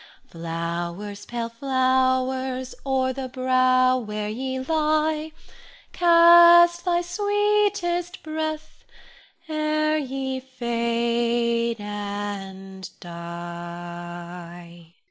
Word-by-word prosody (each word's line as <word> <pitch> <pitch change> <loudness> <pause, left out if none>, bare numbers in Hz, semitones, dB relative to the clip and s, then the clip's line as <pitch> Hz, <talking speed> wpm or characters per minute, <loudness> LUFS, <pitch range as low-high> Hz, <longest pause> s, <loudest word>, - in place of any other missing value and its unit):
Flowers, 170 +4 -5
pale 235 -1 -4
flowers, 260 0 0
o'er 260 -1 +1
the 260 -1 -5
brow 255 0 +3
where 210 -2 -4
ye 260 +4 -3
lie, 310 +2 0 0.6
Cast 345 0 +7
thy 350 -1 +1
sweetest 410 -2 0
breath 310 0 -5 0.6
ere 310 0 0
ye 265 -1 -3
fade 235 -2 -1
and 200 -2 -6
die. 175 0 -9
255 Hz, 70 wpm, -24 LUFS, 200-310 Hz, 0.6 s, Cast